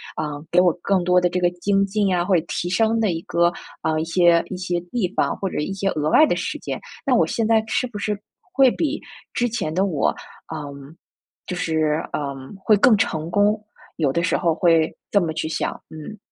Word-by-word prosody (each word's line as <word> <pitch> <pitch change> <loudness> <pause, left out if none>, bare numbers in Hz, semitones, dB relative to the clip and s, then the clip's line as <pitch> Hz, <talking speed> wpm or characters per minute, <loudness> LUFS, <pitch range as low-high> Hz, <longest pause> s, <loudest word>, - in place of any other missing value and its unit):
呃， - - -2 0.3
给 175 - +5
我 180 -2 +4
更 190 -3 +1
多 180 0 +4
的 180 - +2
这 180 - -2
个 175 -1 +3
精 195 +2 +1
进 200 -2 +1
啊， 175 - +1
或 195 - +1
者 165 - +3
提 175 - -3
升 225 +4 +2
的 215 -5 +2
一 165 0 -3
个， 170 0 +2 0.3
啊， 155 0 0
一 160 - -1
些 170 0 +4
一 185 - -4
些 175 -1 -2
地 230 -7 0
方， - - +1
或 195 - -2
者 - - -5
一 195 +6 -2
些 195 0 -1
额 150 0 -1
外 310 - +7
的 - - +1
时 - - -3
间， - - -5 0.3
那 265 - +2
我 - - +3
现 225 - -1
在 225 -1 +4
是 255 - 0
不 215 -4 -8
是 205 +1 -1 0.4
会 265 -2 +5
比 305 -2 -2 0.3
之 245 - +1
前 190 -9 -3
的 190 +3 +2
我， 160 -8 0 0.4
嗯， 140 0 -8 0.5
就 180 - -4
是， 160 -2 0
呃， 140 -2 -2 0.3
会 215 - +5
更 215 +1 +5
成 160 -5 -1
功， 205 +3 +2 0.4
有 145 -5 +1
的 170 - 0
时 - - +1
候 165 -2 +1
会 165 -3 +3 0.2
这 200 - +5
么 160 -2 -2
去 155 0 -3
想， 160 - -1 0.2
嗯。 160 +7 -9
180 Hz, 240 characters per minute, -22 LUFS, 160-205 Hz, 0.5 s, 外